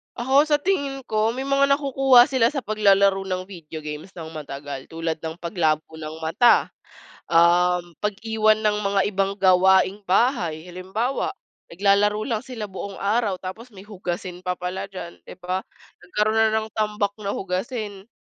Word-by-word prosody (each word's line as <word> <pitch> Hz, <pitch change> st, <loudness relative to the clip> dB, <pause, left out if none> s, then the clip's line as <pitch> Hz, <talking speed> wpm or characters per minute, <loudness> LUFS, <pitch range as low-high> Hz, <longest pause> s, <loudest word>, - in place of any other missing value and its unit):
Ako 265 Hz, +5 st, +3 dB
sa 295 Hz, -1 st, +1 dB
tingin 280 Hz, -7 st, -1 dB
ko, 215 Hz, +1 st, +1 dB
may 255 Hz, -, -4 dB
mga 275 Hz, +1 st, +3 dB
nakukuha 270 Hz, -3 st, +5 dB
sila 260 Hz, -4 st, +2 dB
sa 275 Hz, -, -2 dB
paglalaro 200 Hz, -3 st, +3 dB
ng 185 Hz, 0 st, -4 dB
video 160 Hz, -4 st, -9 dB
games 150 Hz, +5 st, -7 dB
ng 165 Hz, -2 st, -8 dB
matagal, 140 Hz, -3 st, -7 dB
tulad 165 Hz, 0 st, -3 dB
ng 160 Hz, +2 st, -7 dB
paglabo 160 Hz, -4 st, +1 dB
ng 160 Hz, 0 st, -8 dB
mata, 165 Hz, +10 st, +4 dB, 0.6 s
um, 175 Hz, 0 st, +3 dB
pag-iwan 215 Hz, +1 st, +1 dB
ng 210 Hz, -1 st, +1 dB
mga 200 Hz, -1 st, 0 dB
ibang 195 Hz, -1 st, 0 dB
gawaing 190 Hz, +2 st, +4 dB
bahay, 180 Hz, -, +1 dB
halimbawa, 190 Hz, +9 st, -2 dB, 0.4 s
naglalaro 205 Hz, +4 st, +2 dB
lang 225 Hz, -3 st, -2 dB
sila 225 Hz, -5 st, -6 dB
buong 195 Hz, +1 st, -7 dB
araw 205 Hz, -2 st, 0 dB
tapos 220 Hz, +6 st, -8 dB
may 190 Hz, -, -12 dB
hugasin 180 Hz, -2 st, -6 dB
pa 180 Hz, -, 0 dB
pala 180 Hz, +2 st, -4 dB
diyan, 170 Hz, -2 st, -8 dB
'di -, -, -11 dB
ba? 185 Hz, +1 st, -3 dB, 0.4 s
Nagkaroon 210 Hz, +4 st, 0 dB
na 220 Hz, 0 st, +4 dB
ng 220 Hz, -, -7 dB
tambak 210 Hz, -2 st, 0 dB
na 200 Hz, -, -1 dB
hugasin. 200 Hz, +1 st, -4 dB
195 Hz, 155 wpm, -23 LUFS, 180-220 Hz, 0.6 s, nakukuha